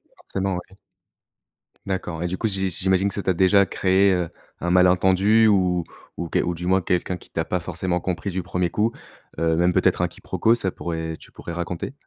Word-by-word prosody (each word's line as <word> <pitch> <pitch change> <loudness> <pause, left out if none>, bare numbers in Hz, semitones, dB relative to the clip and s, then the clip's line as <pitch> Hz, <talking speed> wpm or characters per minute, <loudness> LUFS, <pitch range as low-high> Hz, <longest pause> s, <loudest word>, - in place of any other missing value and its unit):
Forcément, 95 -1 -3
ouais. 90 +2 -9 1.1
D'accord, 90 -4 -3
et - - 0
du 90 +2 -3
coup, 115 - 0
j'i 95 -2 -1
j'imagine 95 +2 +1
que 100 - -2
ça 100 - -4
t'a 95 - +2
déjà 95 +3 +4
créé, 95 +2 +3
heu, 90 -3 0 0.3
un 90 - -1
malentendu 95 +4 +4
ou 90 -4 +2 0.3
ou 85 - -3
que - - +1
ou 90 - 0
du 85 +1 -6
moins 95 +1 +3
quelqu'un 90 +1 -1
qui - - -18
t'a 80 - -2
pas 90 - -1
forcément 90 +1 -2
compris 95 +2 -3
du 90 0 -3
1er 90 0 -1
coup, 105 +6 +1 0.5
heu, 80 0 +2
même 90 +2 +3
peut-être - - +2
un - - +2
quiproquo, 115 - 0
ça 95 -6 -1
pourrait 80 -2 -4
tu - - -17
pourrais 85 - -8
raconter? 85 +7 -4
90 Hz, 205 wpm, -23 LUFS, 85-95 Hz, 1.1 s, déjà